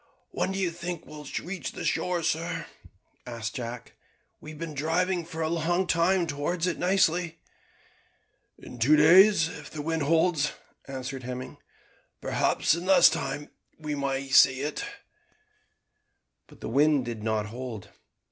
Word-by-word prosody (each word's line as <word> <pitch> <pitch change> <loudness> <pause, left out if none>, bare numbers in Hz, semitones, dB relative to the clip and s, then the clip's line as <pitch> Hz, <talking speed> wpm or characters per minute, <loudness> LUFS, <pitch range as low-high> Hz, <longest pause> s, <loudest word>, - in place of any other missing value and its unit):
"When 190 - -1
do 190 - -3
you 185 -3 0
think 170 0 -6
we 150 0 -10
shall 140 - -5
reach 180 +1 -5
the - - -6
shore, 180 -2 0
sir?" 165 +2 -1 0.6
asked 115 -2 -5
Jack. 120 -1 -6 0.5
"We 155 - -11
have 155 - -9
been 165 -2 -5
driving 170 +4 0
for 165 -1 -4
a - - 0
long 170 +3 0
time 175 +2 +2
towards 165 +3 -2
it 180 - -2
nicely." 180 -3 +1 1.2
"In 125 - -12
two 140 +7 +5
days 170 +3 +6
if 150 -4 -9
the 150 -1 -6
wind 160 +1 -1
holds," 160 0 +2 0.3
answered 135 0 -5
Hemming; 125 +1 -6 0.6
"perhaps - - +1
in 170 +3 -3
less 190 - +7
time 145 -2 -4 0.3
we 150 -1 -4
may 140 -1 -2
sight 130 0 +6
it." 145 +3 -3 1.6
But - - -18
the - - -5
wind 145 +1 +3
did 115 -2 -5
not 110 -1 -1
hold. 115 -2 -7
155 Hz, 150 wpm, -27 LUFS, 135-170 Hz, 1.6 s, less